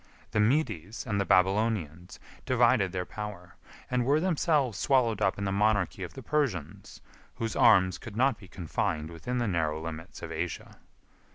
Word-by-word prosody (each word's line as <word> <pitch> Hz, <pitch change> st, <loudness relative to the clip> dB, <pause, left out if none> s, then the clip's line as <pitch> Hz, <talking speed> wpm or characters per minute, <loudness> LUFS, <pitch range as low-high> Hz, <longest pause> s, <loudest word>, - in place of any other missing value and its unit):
The -, -, 0 dB
Medes 105 Hz, -, 0 dB
and 100 Hz, -2 st, 0 dB
the -, -, -1 dB
Babylonians 95 Hz, -3 st, +1 dB, 0.3 s
divided 120 Hz, -6 st, +3 dB
their 90 Hz, -1 st, -3 dB
power, 100 Hz, -5 st, -8 dB, 0.3 s
and 125 Hz, -1 st, 0 dB
were 140 Hz, +5 st, +3 dB
themselves 150 Hz, -, +1 dB
swallowed 120 Hz, -7 st, +2 dB
up 95 Hz, -2 st, +2 dB
in 100 Hz, -, -4 dB
the 95 Hz, -, 0 dB
monarchy 105 Hz, -1 st, +1 dB
of 90 Hz, -, -6 dB
the 135 Hz, -, -8 dB
Persians, 120 Hz, -, -2 dB, 0.3 s
whose 115 Hz, -1 st, -3 dB
arms 95 Hz, -1 st, +5 dB
could 110 Hz, -, -9 dB
not 130 Hz, -2 st, +2 dB
be 95 Hz, -, -13 dB
confined 80 Hz, -2 st, -3 dB
within 120 Hz, +10 st, -4 dB
the 120 Hz, -2 st, 0 dB
narrow 80 Hz, -5 st, 0 dB
limits 80 Hz, 0 st, -8 dB
of -, -, -6 dB
Asia. -, -, -5 dB
105 Hz, 165 wpm, -29 LUFS, 90-125 Hz, 0.3 s, arms